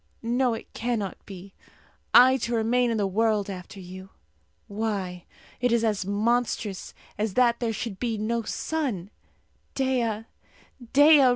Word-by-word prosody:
No, 240 +1 +1
it - - -11
cannot 225 -5 -3
be 195 0 -10 0.6
I 255 +2 +7
to 240 -1 -2
remain 240 +2 +2
in 230 - 0
the 205 - +1
world 210 0 +1
after 185 +1 -9
you! 185 +1 -10 0.6
Why, 200 -4 -3 0.3
it 245 -1 +1
is 235 -1 +2
as 210 -4 0
monstrous 215 -1 -1 0.2
as 210 -2 -1
that 240 -2 +3
there 235 -2 0
should 220 -2 -5
be 230 -3 -1
no 230 +2 -1
sun! 230 - -3 0.6
Dea! 240 -5 0 0.7
Dea! 290 -1 +7
225 Hz, 135 wpm, -26 LUFS, 200-245 Hz, 0.7 s, I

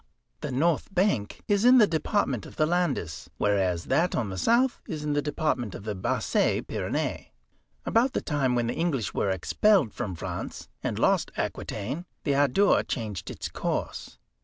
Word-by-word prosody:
The 150 - -4
north 155 +7 +1
bank 175 - 0
is 205 -1 +2
in 250 +1 +8
the 225 - +8
Department 160 - 0
of - - -13
the 155 - +2
Landes, 155 - -1
whereas 95 -4 +1
that 165 +7 +2
on 110 -5 -1
the 95 - -5
south 240 +2 +2
is 155 -2 -4
in 150 -1 -1
the 145 - +2
Department 145 - -1
of - - -8
the 105 0 -3
Basses 95 - 0
Pyrénées. - - -3 0.6
About 245 +4 +2
the - - 0
time 140 -5 0
when 120 -1 +1
the 115 - -1
English 145 - -1
were 100 - 0
expelled 145 - +2
from 105 -7 -4
France, 80 - -6
and - - -2
lost - - +2
Aquitaine, 125 - -3 0.2
the 145 - +1
Adour 145 +9 +4
changed 105 -6 -4
its - - -5
course. - - -4
145 Hz, 170 wpm, -27 LUFS, 105-175 Hz, 0.6 s, in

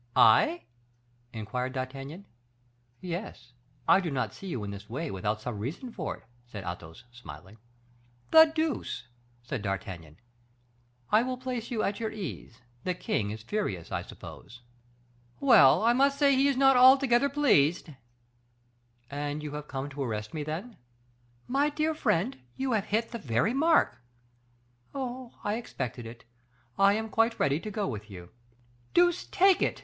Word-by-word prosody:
"I?" 115 +10 +5 0.7
inquired 125 +4 -4
D'Artagnan. 135 +7 -6 0.8
"Yes; 170 - -6 0.3
I - - +6
do 180 -4 -2
not 135 -3 -2
see 195 - -10
you 130 - -3
in 100 - -5
this 100 +1 -9
way 150 +7 -4
without 105 +3 -2
some 115 -3 -5
reason 155 - -5
for 160 -8 -4
it," - - -22 0.2
said 105 -5 -8
Athos, 85 +4 -8
smiling. 95 -3 -12 0.7
"The 320 0 +10
deuce!" 315 -2 -2 0.4
said 120 -1 -4
D'Artagnan. 95 -6 -5 0.9
"I 215 - +6
will 255 +1 -2
place 250 -3 -4
you 230 -3 -1
at 200 - -1
your 225 -1 -2
ease. 170 - -7 0.2
The 180 - -1
king 105 - -1
is 110 +1 -7
furious, 110 - -3
I - - -1
suppose?" 120 +1 -12 0.8
"Well, 220 - +6
I 235 +1 +5
must 275 +2 +3
say 280 -1 +4
he 270 +2 +4
is 275 -2 +1
not 270 0 +6
altogether 260 +1 +6
pleased." 180 - +3 1.2
"And 145 +1 -3
you 150 - -5
have 150 0 -6
come 135 0 -4
to 140 +1 -6
arrest 105 -4 -3
me, 155 - -3
then?" 170 +11 -5 0.7
"My 280 +3 +2
dear 310 +2 0
friend, 220 - 0 0.2
you 265 -1 -2
have 215 -3 +1
hit 225 +2 -1
the 235 - -5
very 125 - 0
mark." 320 - +3 0.9
"Oh, 255 -2 -5
I 205 +2 -1
expected 125 - -5
it. 115 +1 -11 0.5
I 195 0 +5
am 220 +1 -2
quite 225 +1 +1
ready 140 +2 +2
to 215 - -6
go 205 -1 -2
with 105 -3 -6
you." 90 -3 -11 0.6
"Deuce 350 0 +3
take 385 -1 +4
it!" - - 0
175 Hz, 155 wpm, -29 LUFS, -, 1.2 s, The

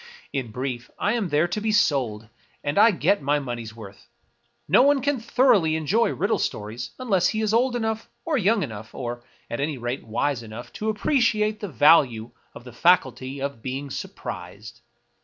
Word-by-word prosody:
In 130 -5 -2
brief, 125 +1 -5
I 205 - +1
am 220 -7 -1
there 150 +3 +2
to 210 +5 -2
be 220 0 0
sold, 130 - +1 0.4
and 145 +7 0
I 225 - +8
get 200 -1 +1
my 145 +2 +2
money's 120 -5 -5
worth. 100 -3 -12 0.6
No - - +6
one 285 +1 +4
can 280 0 0
thoroughly 225 -9 +3
enjoy 190 +9 +2
riddle 200 +3 0
stories 110 +3 -4
unless 200 -8 +2
he 220 - -1
is 215 0 0
old 245 +2 +2
enough, 220 -1 -2 0.2
or 325 - 0
young 215 -3 +2
enough, 110 -3 -8
or, 120 -1 -5 0.2
at 120 - -5
any 145 0 -1
rate, 120 +2 -4
wise 120 +3 -1
enough 115 +2 -9
to 215 - -3
appreciate 215 -2 +1
the 205 - -5
value 130 -5 +4 0.2
of - - -10
the 125 -2 -11
faculty 135 -3 +2
of 140 -4 -4
being 135 +3 -5
surprised. - - -7
145 Hz, 175 wpm, -24 LUFS, -, 0.6 s, I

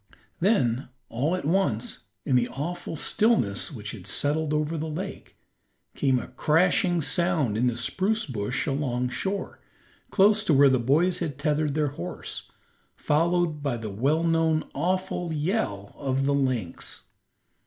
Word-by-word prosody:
Then 135 - +2 0.2
all 145 +9 0
at 185 - -5
once, 160 - 0 0.3
in 130 - +2
the 120 -1 +3
awful 165 +5 -4
stillness 185 - +1
which 105 -6 -6
had 100 -4 -10
settled 150 +8 0
over 150 +1 0
the 160 0 -3
lake, 185 +6 -6 0.6
came 135 -2 +2
a - - -5
crashing 170 +4 +2
sound 165 - +1
in 120 +3 +2
the 120 -1 0
spruce 195 - 0
bush 125 -1 -2
along 130 -4 -1
shore, 195 +9 -3 0.5
close 210 +1 +4
to 160 - +4
where 140 0 +7
the 130 -1 +3
boys 155 +9 +2
had 145 -4 -3
tethered 150 0 0
their 150 -2 +1
horse, 90 +1 -6 0.5
followed 165 0 +1
by 140 -4 -1
the 110 -2 -5
well 140 +11 +1
known, 165 -1 +2
awful 180 +2 -1
yell 150 - -2
of 135 -1 -1
the 140 - +2
lynx. 130 -10 -2
150 Hz, 145 wpm, -26 LUFS, 125-175 Hz, 0.6 s, where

